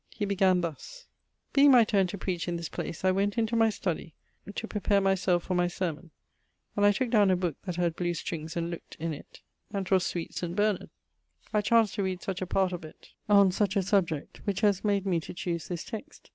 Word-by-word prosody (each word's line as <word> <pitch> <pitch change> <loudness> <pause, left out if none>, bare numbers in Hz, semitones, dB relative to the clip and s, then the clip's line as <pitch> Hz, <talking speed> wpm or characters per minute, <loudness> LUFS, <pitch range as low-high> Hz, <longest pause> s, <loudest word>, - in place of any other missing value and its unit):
He 210 - -1
began 190 -2 +3
thus: 485 - -6 0.5
'being 285 0 +7
my 250 -3 +8
turne 200 -4 +2
to 200 - -5
preach 180 -2 -3
in 175 - -1
this 170 -1 -5
place, 165 - -5
I 185 - +5
went 200 +3 0
into 230 0 +1
my 225 -1 +4
study 175 -6 -4 0.4
to 225 - -4
prepare 205 -1 +1
my 195 0 +3
selfe 180 -2 +1
for - - -3
my 180 0 +2
sermon, 175 -2 -4 0.7
and 205 - +1
I - - +6
tooke 235 +4 -1
downe 210 -4 +5
a 185 - +4
booke 175 -4 -3
that 180 -3 -3
had 170 -2 0
blew 175 0 -1
strings, 165 0 -5
and 170 0 -2
look't 170 - -8
in 165 0 -2
it, 145 - -12 0.3
and 195 -1 -2
'twas 185 -1 +3
sweet 170 -2 -3
Saint 175 -1 -4
Bernard. 205 -4 +1 0.6
I 210 - +3
chanced 225 0 +3
to 200 - +1
read 185 -1 -3
such 190 -1 -3
a 185 - -2
part 190 0 +1
of 175 - -5
it, 155 - -13 0.2
on 200 -2 +6
such 195 0 0
a 200 - +2
subject, 175 -6 0
which 200 -2 -1
haz 205 -3 +2
made 200 -2 +1
me 180 -3 +1
to 160 - -9
choose 170 -2 -3
this 175 -2 -4
text 245 +8 -9
190 Hz, 230 wpm, -29 LUFS, 175-205 Hz, 0.7 s, my